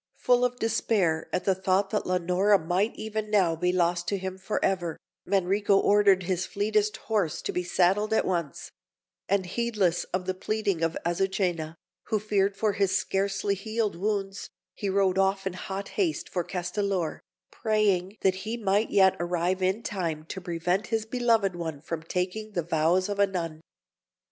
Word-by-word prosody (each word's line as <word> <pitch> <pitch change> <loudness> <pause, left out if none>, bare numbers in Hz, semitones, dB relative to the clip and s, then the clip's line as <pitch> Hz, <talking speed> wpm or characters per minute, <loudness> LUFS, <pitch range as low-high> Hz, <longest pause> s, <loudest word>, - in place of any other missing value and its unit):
Full 245 0 +3
of 250 0 0
despair 205 -8 0
at 180 - -1
the 195 - +3
thought 190 +1 +1
that 210 - -1
Leonora 180 +3 +3
might 185 +6 0
even 215 0 -4
now 190 -6 +3
be 180 +2 +1
lost 175 -1 +1
to 200 - 0
him 190 0 -5
for 195 +3 -2
ever, 175 -4 -1 0.3
Manrico 195 +1 +2
ordered 200 -2 +4
his 180 0 -1
fleetest 210 +1 0
horse 205 -8 -1
to - - -2
be 180 - -1
saddled 185 +4 +2
at 220 - +2
once; 170 -6 -3 0.6
and, 195 -1 +2
heedless 200 -4 0
of 185 0 -3
the 185 - -1
pleading 200 -2 -1
of 165 0 0
Azucena, 175 -3 -1 0.3
who 220 - 0
feared 205 -1 0
for 215 -1 +1
his 195 -2 +2
scarcely 195 +1 0
healed 215 +1 -2
wounds, 195 +1 -2 0.2
he 200 - -3
rode 190 -1 +2
off 195 0 +1
in 190 - -2
hot 190 +2 -5
haste 350 -6 -1
for 180 - -1
Castellor, 180 0 -2 0.3
praying 210 -3 +1
that 190 -1 +2
he 225 +2 -3
might 205 0 +1
yet 190 -2 +5
arrive 175 +2 0
in 190 +5 0
time 165 -6 -3
to 190 - -5
prevent 180 +3 -1
his 225 -1 -1
beloved 225 -5 +1
one 160 -4 -4
from 160 +2 -5
taking 185 +6 -3
the 175 - -1
vows 170 +3 +2
of 205 -1 -4
a 200 - +5
nun. 165 -5 -4
190 Hz, 170 wpm, -27 LUFS, 180-210 Hz, 0.6 s, yet